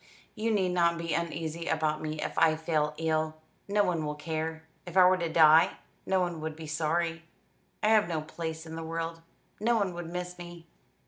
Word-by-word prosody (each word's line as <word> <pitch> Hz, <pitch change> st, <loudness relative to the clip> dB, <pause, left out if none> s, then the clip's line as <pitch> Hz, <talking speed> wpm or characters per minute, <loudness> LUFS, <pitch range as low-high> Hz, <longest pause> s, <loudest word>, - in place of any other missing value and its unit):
You 220 Hz, +2 st, -2 dB
need 195 Hz, -4 st, +2 dB
not 170 Hz, -1 st, +2 dB
be 170 Hz, -1 st, -3 dB
uneasy 165 Hz, 0 st, -3 dB
about 155 Hz, -1 st, 0 dB
me 155 Hz, 0 st, -4 dB
if -, -, -4 dB
I 160 Hz, -1 st, +4 dB
fall 155 Hz, -2 st, 0 dB
ill. 155 Hz, -1 st, 0 dB, 0.3 s
No 205 Hz, +1 st, +3 dB
one 170 Hz, -4 st, 0 dB
will 150 Hz, 0 st, -3 dB
care. 160 Hz, +1 st, -4 dB, 0.2 s
If 175 Hz, +1 st, -4 dB
I 185 Hz, -, +9 dB
were 185 Hz, 0 st, +5 dB
to 170 Hz, -2 st, -2 dB
die, 160 Hz, 0 st, +6 dB, 0.3 s
no 190 Hz, -1 st, +3 dB
one 175 Hz, -3 st, -2 dB
would 155 Hz, 0 st, -4 dB
be 160 Hz, 0 st, -8 dB
sorry. 165 Hz, +2 st, -1 dB, 0.6 s
I 210 Hz, -, +4 dB
have 215 Hz, -3 st, +5 dB
no 160 Hz, -2 st, -1 dB
place 160 Hz, +1 st, -6 dB
in 160 Hz, -, -9 dB
the 165 Hz, -, -5 dB
world. 165 Hz, 0 st, -4 dB, 0.4 s
No 235 Hz, +3 st, +2 dB
one 200 Hz, -4 st, 0 dB
would 170 Hz, -1 st, -6 dB
miss 180 Hz, 0 st, -5 dB
me." 175 Hz, -1 st, -10 dB
165 Hz, 200 wpm, -29 LUFS, 160-175 Hz, 0.6 s, I